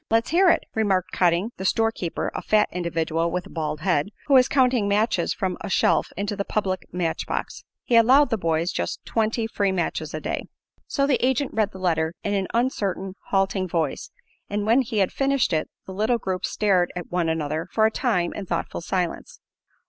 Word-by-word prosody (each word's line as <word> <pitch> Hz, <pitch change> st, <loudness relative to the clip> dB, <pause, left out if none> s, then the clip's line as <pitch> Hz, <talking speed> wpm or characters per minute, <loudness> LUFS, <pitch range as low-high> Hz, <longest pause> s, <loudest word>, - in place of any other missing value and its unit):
"Let's 225 Hz, +3 st, +2 dB
hear 365 Hz, +2 st, +5 dB
it," -, -, +3 dB
remarked 195 Hz, -4 st, +1 dB
Cotting, 180 Hz, +5 st, +2 dB
the 190 Hz, -, -5 dB
store 225 Hz, +3 st, +2 dB
keeper, 175 Hz, -6 st, -3 dB
a -, -, -4 dB
fat 210 Hz, -1 st, +2 dB
individual 165 Hz, -1 st, -1 dB
with 180 Hz, +1 st, -3 dB
a -, -, -13 dB
bald 150 Hz, -2 st, -3 dB
head, 175 Hz, -2 st, +1 dB, 0.2 s
who 285 Hz, -, +1 dB
was 255 Hz, -1 st, +7 dB
counting 250 Hz, -6 st, +2 dB
matches 205 Hz, -3 st, +1 dB
from 185 Hz, -2 st, -2 dB
a 205 Hz, -, -5 dB
shelf -, -, +2 dB
into 200 Hz, +1 st, -2 dB
the 200 Hz, -, -2 dB
public 190 Hz, -3 st, -2 dB
match 175 Hz, -3 st, -2 dB
box. -, -, -4 dB, 0.2 s
He 240 Hz, -, +1 dB
allowed 255 Hz, +5 st, +6 dB
"the 225 Hz, -, +2 dB
boys" 165 Hz, +1 st, 0 dB
just -, -, -4 dB
twenty 225 Hz, 0 st, 0 dB
free 205 Hz, -3 st, 0 dB
matches 160 Hz, -4 st, -2 dB
a -, -, -3 dB
day. -, -, -3 dB, 0.4 s
So 275 Hz, -, +1 dB
the 275 Hz, -3 st, +1 dB
agent 265 Hz, +1 st, +1 dB
read 215 Hz, -2 st, +1 dB
the 190 Hz, -, -10 dB
letter 165 Hz, -3 st, 0 dB
in 205 Hz, -, -1 dB
an 195 Hz, -2 st, 0 dB
uncertain 200 Hz, -6 st, -1 dB
halting 195 Hz, -1 st, +1 dB
voice, 165 Hz, -4 st, -2 dB, 0.4 s
and 205 Hz, 0 st, -2 dB
when 230 Hz, +5 st, +4 dB
he 230 Hz, -3 st, -4 dB
had 195 Hz, -2 st, +2 dB
finished 275 Hz, -7 st, +1 dB
it 155 Hz, -, 0 dB, 0.2 s
the 190 Hz, -, -8 dB
little 220 Hz, +5 st, +1 dB
group 190 Hz, -4 st, -3 dB
stared 190 Hz, -4 st, +1 dB
at 175 Hz, -2 st, -6 dB
one 175 Hz, -2 st, 0 dB
another 160 Hz, +1 st, -2 dB
for 220 Hz, +3 st, +3 dB
a 220 Hz, -, +3 dB
time 200 Hz, -9 st, 0 dB
in 200 Hz, -2 st, -6 dB
thoughtful -, -, -3 dB
silence. 180 Hz, 0 st, -3 dB
195 Hz, 200 wpm, -24 LUFS, 175-225 Hz, 0.4 s, was